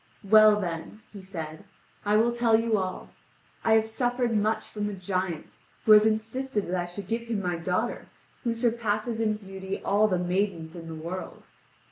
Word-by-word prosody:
"Well, 215 +1 +7
then," 175 +3 -5
he 200 - -9
said, 165 -3 -7 0.4
"I 210 +1 +4
will 230 +2 +3
tell 235 -2 +3
you 230 -1 +1
all. 185 -1 -4 0.5
I 225 - +4
have 220 0 +5
suffered 245 +1 0
much 215 +1 +1
from 210 -1 -3
a 205 - -5
giant, 185 -3 -3 0.3
who 220 - +5
has 215 0 +8
insisted 220 +1 -1
that 180 - -1
I 175 - -4
should 180 +2 -8
give 230 +2 -2
him 225 -3 -1
my 180 -3 -1
daughter, 180 +8 -2 0.4
who 235 -2 0
surpasses 230 -1 0
in 215 -1 +1
beauty 195 -1 -6
all 205 +2 +4
the 185 -3 +1
maidens 180 -2 -1
in 165 -1 -8
the 165 - -6
world. 170 +4 -6
210 Hz, 180 wpm, -27 LUFS, 185-225 Hz, 0.5 s, has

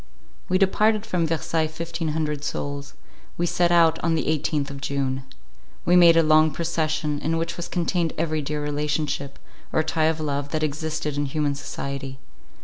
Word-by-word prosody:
We 185 - +3
departed 210 +3 +3
from 180 -6 0
Versailles 160 0 0
fifteen 165 +1 -4
hundred 150 -2 -2
souls. 145 -1 -4 0.4
We 175 - +1
set 175 0 +2
out 165 -2 +5
on 165 0 +1
the 160 - -1
eighteenth 150 -2 0
of 140 -1 -8
June. 135 -1 -1 0.6
We 175 - +4
made 170 -2 +7
a 165 - +6
long 155 0 +5
procession, 155 -1 -1
in 165 +2 -1
which 165 +1 -2
was 175 0 -5
contained 175 -1 0
every 155 -2 0
dear 150 +1 -3
relationship, 145 -1 -2 0.3
or 160 - +2
tie 160 0 +1
of 160 0 +1
love, 145 -2 -2
that 155 0 0
existed 155 0 -2
in 145 0 0
human 145 +1 0
society. 140 -1 -5
155 Hz, 170 wpm, -24 LUFS, 145-165 Hz, 0.6 s, made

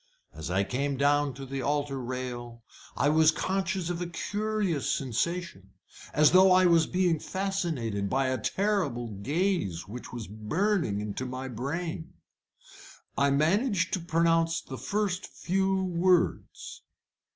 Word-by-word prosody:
As - - -6
I 95 +2 +2
came 140 +5 -2
down 145 -1 +2
to 135 0 -7
the 135 0 -4
altar 145 0 -1
rail 120 -2 -6 0.3
I 145 - +3
was 155 +1 +5
conscious 190 +1 -1
of 175 0 -4
a 175 - -2
curious 205 -3 -1
sensation 135 - -2 0.4
as 150 -1 +5
though 185 +1 +7
I 185 0 +6
was 170 -2 +4
being 180 -3 +1
fascinated 160 - -2
by 135 0 +1
a 130 - -1
terrible 180 - -1
gaze 140 - -1
which 120 +5 -8
was 120 -3 -6
burning 110 - -1
into 105 +5 -4
my 130 +1 -5
brain. 160 +7 -4 1.0
I 140 0 +3
managed 170 - +2
to - - +1
pronounce 165 0 +2
the 130 -3 -8
first 195 - -1
few 190 +1 0
words. 180 0 0
155 Hz, 135 wpm, -28 LUFS, 130-185 Hz, 1.0 s, though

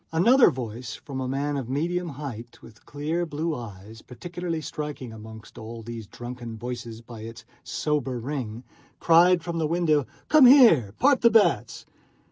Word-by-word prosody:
Another 235 +11 +5
voice, 120 0 -6
from 135 -2 -7
a 130 - -3
man 140 +2 -2
of 130 -3 -5
medium 170 +6 -1
height 130 -5 -8
with 110 - -17
clear 155 +4 -2
blue 160 0 -3
eyes, 110 -2 -10
particularly 175 +5 -5
striking 150 -6 -6
among 110 0 -11
all 115 0 -9
these 115 -2 -8
drunken 120 -1 -8
voices 120 -1 -7
by 115 -1 -11
its 115 0 -10 0.2
sober 150 -6 -2
ring, 120 -3 -5 0.4
cried 170 +1 +5
from 170 -1 -3
the 155 - 0
window: 155 -4 +1 0.2
"Come 300 -4 +7
here; 220 - +6
part 275 +1 +3
the 235 - +6
bets!" 220 -2 +2
135 Hz, 155 wpm, -25 LUFS, 115-165 Hz, 0.4 s, Come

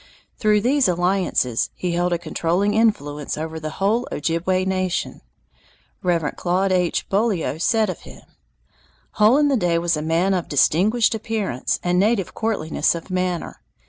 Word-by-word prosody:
Through 210 -1 +3
these 265 +3 +2
alliances 175 -9 0
he 180 - -3
held 175 +1 0
a 175 - +1
controlling 175 +4 -1
influence 150 -11 0
over 160 +1 -5
the 155 0 -5
whole 220 +6 +1
Ojibway 175 +4 -1
nation. 185 -1 -2 0.8
Reverend 170 -5 -1
Claude 185 +2 0
H. 180 -2 0
Beaulieu 195 -7 0
says 220 +5 +2
of 185 - -5
him: - - -14 1.0
"Hole 220 +6 +6
in 295 0 +3
the 280 - +2
Day 175 -7 +1
was 170 0 +1
a 150 - -3
man 165 +5 +1
of 180 -3 -2
distinguished 205 - +2
appearance 215 - -2
and 180 0 +1
native 205 -2 +1
courtliness 185 -9 0
of 170 +2 -8
manner. 180 -2 -2
180 Hz, 150 wpm, -21 LUFS, 165-210 Hz, 1.0 s, Hole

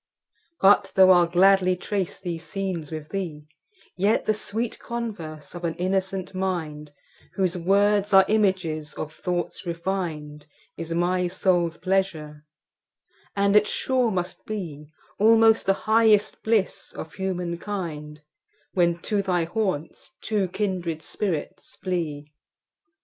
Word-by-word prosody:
But 195 +1 +5
though 190 -1 +7
I'll 175 -1 +5
gladly 185 +1 +4
trace 190 0 -3
these 175 -3 -5
scenes 185 -7 -4
with 155 -1 -6
thee, 165 -7 -4 0.5
Yet 200 +4 +1
the 215 - +3
sweet 220 +2 -3
converse 175 -11 -6
of 175 0 -8
an 165 -1 -1
innocent 190 +1 -2
mind, 160 -6 -3 0.4
Whose 185 -2 0
words 200 +3 +2
are 195 -1 +7
images 185 -8 0
of 155 0 -5
thoughts 175 -1 -3
refin'd, 165 -4 -4 0.3
Is 165 0 -7
my 180 +2 +1
soul's 175 -2 +1
pleasure; 165 -6 -1 0.9
and 200 0 +2
it 210 0 +6
sure 255 0 +1
must 180 -3 -3
beAlmost 215 +5 +1
the 195 - +2
highest 220 -1 +3
bliss 220 -4 0
of 160 - -8
human 180 -3 -3
kind, 155 -7 -6 0.5
When 170 -2 +2
to 210 -2 0
thy 180 -3 0
haunts 175 -4 -3
two 210 -3 0
kindred 180 -4 -3
spirits 185 -8 -4
flee. 155 -6 -4
185 Hz, 120 wpm, -25 LUFS, 165-200 Hz, 0.9 s, though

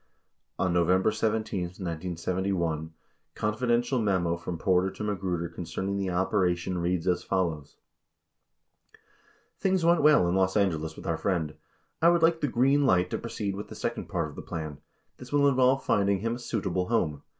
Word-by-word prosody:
44 - - +1
A 85 - 0
November 90 +4 +3
17, 110 -3 -1
1971, 85 -1 -3 0.4
confidential 120 +4 0
memo 90 -5 +1
from 85 0 -5
Porter 95 +1 +2
to 105 - -7
Magruder 95 -5 -2
concerning 90 +4 -4
the 100 -1 -1
operation 90 -1 0
reads 85 0 -1
as 90 -1 +1
follows: 80 -6 -2 1.8
Things 185 -3 +1
went 170 0 +4
well 150 -11 +5
in 85 - +1
Los 95 +1 +2
Angeles 80 -6 0
with - - -11
our - - -1
friend. 85 -6 -1 0.5
I 170 - +6
would 170 -1 +3
like 165 0 +3
the 145 - +1
"green 135 +3 +3
light" 90 -5 +3
to - - -2
proceed 105 -4 -4
with 105 - -6
the - - -10
second 120 0 -4
part 85 -5 -1
of 75 - -11
the - - -7
plan. 80 -3 -6 0.4
This 125 0 -12
will 145 -1 +4
involve 130 0 +3
finding 100 -1 +2
him 115 +1 -1
a 120 - -5
"suitable" 95 -6 -2
home. 80 -11 0
95 Hz, 170 wpm, -28 LUFS, 85-115 Hz, 1.8 s, I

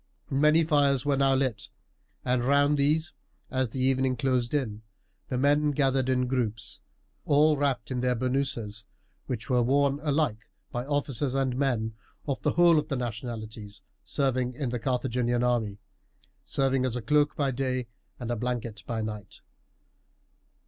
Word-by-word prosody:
Many 150 +4 +4
fires 145 -4 +2
were 145 -1 +2
now 135 0 +3
lit; 130 -6 -1 0.6
and 125 -1 +1
round 145 +3 +4
these, 150 +3 +1 0.4
as 130 -2 0
the 130 +4 -4
evening 130 0 +2
closed 125 -3 0
in, 115 -8 -2 0.5
the 125 - -2
men 145 +3 +3
gathered 135 -2 +1
in 125 -1 +2
groups, 110 -6 -3 0.4
all 150 +2 +4
closely 145 - -3
wrapped 140 -2 0
in 125 -1 -1
their 125 0 +1
bernouses, 120 -4 -2 0.4
which 120 -3 -4
were 125 -2 +3
worn 140 +3 +2
alike 145 -8 -1 0.2
by 125 +2 -4
officers 145 -2 -1
and 135 -2 0
men 120 -5 0 0.3
of 140 - -2
the - - +1
whole 170 -2 +5
of 150 - -4
the 140 - -2
nationalities 110 -3 -6 0.2
serving 130 -2 -1
in 135 -2 -2
the 120 0 -2
Carthaginian 120 0 0
army, 115 -5 0 0.7
serving 135 -1 +1
as 130 -2 0
a 125 - -4
cloak 150 +4 +2
by 140 -2 0
day 130 -1 -1 0.3
and 120 -1 -4
a - - 0
blanket 115 -2 -3
at 110 -2 -1
night. 105 -2 -7
130 Hz, 155 wpm, -28 LUFS, 120-140 Hz, 0.7 s, whole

